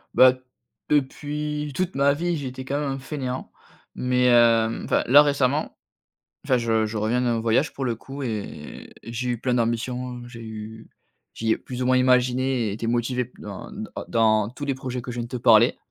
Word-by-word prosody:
Bah, 130 0 +8 0.6
depuis 150 +1 -1
toute 185 0 -2
ma 140 +1 +4
vie, 175 +3 -1
j'ai 140 -3 -4
été 130 +1 -7
quand 140 +2 -1
même 145 -2 -2
un 135 - -4
fainéant, 130 -2 -5 0.4
mais, 125 0 +1
hem, 115 -2 +4
enfin - - +1
là, 145 +4 +8
récemment 145 0 +1 0.7
enfin 130 - +3
je 115 -2 +1
je 110 +1 -5
reviens 110 +4 +1
d'un 120 -2 +1
voyage 115 +7 +1
pour 135 - -4
le 120 -3 -1
coup 135 +4 -8
et 110 -5 -6
et 115 - -8
j'ai 125 +1 -2
eu 120 - -2
plein 125 -1 0
d'ambitions, 125 +1 -2
j'ai 120 -1 -10
eu 110 0 -9 0.5
j'y 110 0 -2
ai - - +2
plus 125 0 -6
ou - - 0
moins 130 0 +4
imaginé 125 -1 +2
et - - -3
été 110 +3 -4
motivé 120 +2 0
p 125 - -19
dans - - -7
hein - - -12
d - - -6 0.2
dans 110 -2 +2
tous 130 +5 -7
les 140 -1 -1
projets 130 -2 -5
que 125 - -7
je 125 - -6
viens 120 - -2
de - - -9
te 125 - -4
parler. 115 0 +5
125 Hz, 210 wpm, -24 LUFS, 115-135 Hz, 0.7 s, Bah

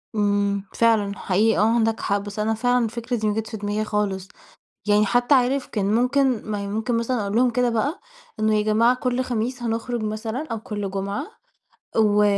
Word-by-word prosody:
إمم 200 -1 +1
فعلًا 215 -3 +2
حقيقي 210 +3 +2
آه 225 +2 +3
عندك 225 -1 +1
حق 200 0 0
بس 205 +1 -7
أنا 215 +1 +1
فعلًا 245 +2 +2
الفكرة 235 +2 -3
دي 215 - -1
ما 210 - +1
جتش 220 +1 -4
في 220 - -4
دماغي 205 +1 -2
خالص، 205 -3 -2 0.6
يعني 210 0 +4
حتى 245 +5 +3
عارف 260 +1 +2
كان 205 -1 -1
ممكن 250 -2 +1
ما 210 - -1
هي 200 - -4
ممكن 220 +4 -1
مثلًا 235 +1 -1
أقول 200 +2 -2
لهم 250 +1 +4
كده 245 0 +1
بقى 270 - -1 0.4
إنه 215 0 +3
يا 210 - +2
جماعة 230 +4 +3
كل 250 0 -1
خميس 245 +1 -2
هنخرج 230 +1 -2
مثلًا 220 +6 -3
أو 225 - -3
كل 210 -4 -4
جمعة 200 +8 -3 0.7
و 210 -1 +4
220 Hz, 195 wpm, -23 LUFS, 205-245 Hz, 0.7 s, يعني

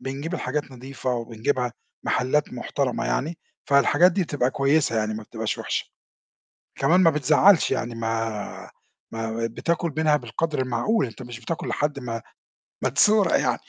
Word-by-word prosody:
بنجيب 135 +6 -4
الحاجات 150 -4 -3
نضيفة 130 +1 -5
وبنجيبها 120 +2 -2 0.3
محلات 145 +4 +1
محترمة 125 -1 -2
يعني، 160 +5 -1 0.3
فالحاجات 145 +6 +5
دي 190 +2 +1
بتبقى 145 -6 0
كويسة 135 -3 +2
يعني 110 0 0
ما 110 - -5
بتبقاش - - -4
وِحشة، - - -2 0.9
كمان 160 +7 +3
ما 170 - +7
بتزعّلش 155 +5 +4
يعني 120 -3 -2
ما 115 -2 -3 0.4
ما 115 0 -3
ب 115 - -4
بتاكل 170 +1 -1
منها 155 -1 +4
بالقدر 160 0 -3
المعقول، 130 - +1
أنت 120 +2 -10
مش 120 -1 -8
بتاكل 160 +8 -4
لحد 145 -1 -1
ما 115 -3 -4 0.6
ما - - +2
تسورق 200 - +4
يعني - - 0
135 Hz, 150 wpm, -24 LUFS, 120-155 Hz, 0.9 s, ما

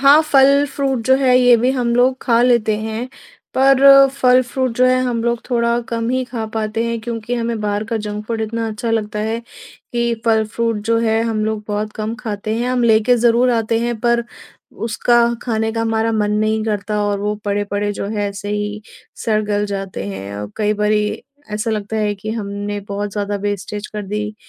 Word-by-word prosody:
हाँ, 280 +3 +7
फल 280 0 +5
फ्रूट 270 -3 0
जो 260 - +6
है, 255 -2 +4
ये 245 -1 +6
भी 245 +3 +2
हम 245 -3 0
लोग 255 +1 +3
खा 235 -1 +3
लेते 235 -4 +3
हैं। 220 +3 -4 0.5
पर 275 +1 +7
फल 255 -2 +3
फ्रूट 255 +1 -2
जो 255 - +4
है 255 0 +3
हम 235 -2 -1
लोग 235 -1 0
थोड़ा 235 -1 +1
कम 230 -1 -2
ही 255 0 0
खा 240 -2 -5
पाते 220 +1 -1
हैं 230 -1 -2
क्योंकि 230 +1 -4
हमें 230 -2 -2
बाहर 205 0 -1
का 225 0 -2
जंक 210 0 -5
फूड 225 -1 -3
इतना 225 +1 -2
अच्छा 220 +2 -4
लगता 210 -2 -1
है 220 +2 -1 0.5
कि 235 -1 0
फल 220 -1 +3
फ्रूट 230 -1 0
जो 230 0 +3
है 225 -1 +1
हम 220 -2 -1
लोग 220 -1 -2
बहुत 210 +1 -2
कम 215 +1 -3
खाते 215 -2 -3
हैं। 245 +2 -1
हम 255 -1 +1
लेके 225 +2 +4
ज़रूर 240 +2 +3
आते 225 -1 +1
हैं 235 -1 -2
पर 235 0 +2 0.6
उसका 240 +2 +2 0.2
खाने 220 -2 -1
का 225 - -2
हमारा 225 0 0
मन 210 -1 0
नहीं 215 0 0
करता 210 -1 -2
और 205 -1 0
वो 210 +1 -1
पड़े-पड़े 205 0 -1
जो 200 - -4
है 205 -1 -1
ऐसे 200 +1 -7
ही 210 0 -3 0.4
सड़-गल 210 -1 0
जाते 195 - -5
हैं 100 +1 -6
और 105 0 -6
कई 210 -1 +1
बारी 210 0 +1 0.5
ऐसा 210 +2 -2
लगता 215 0 -3
है 210 -1 0
कि 210 +2 -6
हमने 205 -1 -4
बहुत 205 0 -3
ज़्यादा 205 -1 -2
वेस्टेज 205 +1 -4
कर 210 -1 -6
दी 210 +1 -3
220 Hz, 200 wpm, -18 LUFS, 210-240 Hz, 0.6 s, हाँ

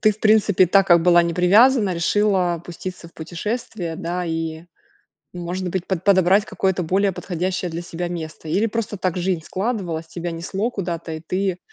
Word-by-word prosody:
ты, 215 - +5
в 215 0 -7
принципе, 210 -3 +4
так 195 +2 +4
как 170 -2 +5
была 175 0 +6
не 170 -1 -2
привязана, 205 +3 +5
решила 180 -1 +1
пуститься 175 0 -8
в - - -24
путешествие, 175 +1 -4
да, 175 +1 -3
и, 165 0 -3 0.7
может 180 +1 -4
быть, 180 0 -3
под 185 -3 -2
подобрать 195 +1 +4
какое-то 190 -4 -1
более 190 +4 +1
подходящее 180 0 -3
для 165 +1 -5
себя 175 0 -5
место? 160 -2 -7
Или 195 +8 +2
просто 225 -1 -3
так 185 -2 -2
жизнь 180 -2 -1
складывалась, 185 -6 -3
тебя 170 +1 -5
несло 190 +7 -3
куда-то, 170 -5 -4
и 160 - -5
ты 185 +1 -1
180 Hz, 175 wpm, -21 LUFS, 170-200 Hz, 0.7 s, была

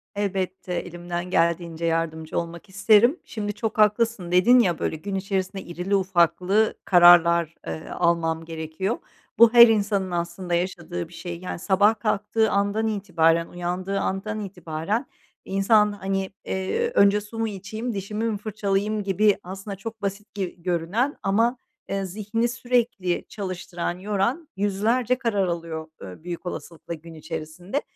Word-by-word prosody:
Elbette, 190 -2 -2
elimden 175 0 -4
geldiğince 170 -1 0
yardımcı 160 -1 -1
olmak 170 +3 -7
isterim. 220 - +4
Şimdi, 205 -2 -4
“Çok 220 +1 -3
haklısın,” 210 -3 +2
dedin 235 +8 +6
ya, 175 -8 +2
böyle, - - -1
gün 195 +5 -5
içerisinde 190 0 -2
irili 180 +3 -2
ufaklı 190 +3 +2
kararlar, 170 -2 +6
eee, 160 - -6
almam 165 -2 0
gerekiyor. 160 +6 -3 0.4
Bu, 235 0 +7
her 235 0 +10
insanın 200 -4 +1
aslında 175 +1 -3
yaşadığı 175 -1 -2
bir 175 - -17
şey. 170 -1 -6
Yani, 180 -1 -5
sabah 205 +4 +3
kalktığı 220 +1 +1
andan 205 +2 +1
itibaren, 170 -5 +2
uyandığı 180 +3 -3
andan 210 +3 -2
itibaren 185 - -3 0.4
insan, 210 +2 +3
hani, 195 -1 -2 0.2
eee, 455 - -1
“Önce 200 +1 +5
su 225 +2 -9
mu 225 - +1
içeyim, 215 +4 -5
dişimi 210 +3 -4
mi 205 - -2
fırçalayayım?” 210 0 -1
gibi, 200 +1 +3
aslında 195 +2 -7
çok 225 +2 -8
basit 200 +1 -4
gi 185 -3 -5
görünen 185 - 0
ama, 225 +5 +2 0.3
eee, 195 0 -1
zihnini 215 +5 -1
sürekli 240 -6 0
çalıştıran, 185 -3 -4
yoran 210 - -1
yüzlerce 220 +5 +1
karar 205 -7 0
alıyor, 165 -2 -4
eee, 95 - -10
büyük 175 0 -6
olasılıkla 170 -1 -6
gün 165 +1 -10
içerisinde. 160 - -5
195 Hz, 140 wpm, -24 LUFS, 175-210 Hz, 0.4 s, her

